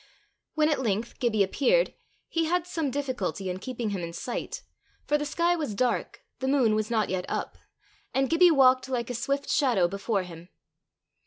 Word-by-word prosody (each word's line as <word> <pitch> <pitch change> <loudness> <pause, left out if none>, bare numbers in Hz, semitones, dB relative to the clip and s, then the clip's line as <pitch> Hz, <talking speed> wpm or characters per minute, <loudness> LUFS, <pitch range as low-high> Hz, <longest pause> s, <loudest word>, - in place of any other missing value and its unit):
When 305 -1 +3
at 300 -4 +1
length 220 -1 -2
Gibbie 220 -4 +2
appeared, 475 - +2 0.3
he 330 -1 0
had 350 +1 0
some 325 -5 -2
difficulty 240 - -2
in 180 - -5
keeping 235 -1 -4
him 195 -3 -3
in 170 0 -5
sight, 240 +7 -5 0.4
for 295 - +1
the 295 0 0
sky 340 +4 +2
was 295 -11 -3
dark, 250 - -1 0.2
the 265 - -2
moon 265 -5 +3
was 215 +1 0
not 220 -3 +1
yet 185 -1 -2
up, - - -3 0.6
and 270 0 +1
Gibbie 340 +3 +6
walked 260 -4 +4
like 245 -2 -2
a - - -3
swift 275 +4 -2
shadow 240 - +3
before 200 +2 -1
him. 170 0 -11
255 Hz, 180 wpm, -27 LUFS, 205-295 Hz, 0.6 s, Gibbie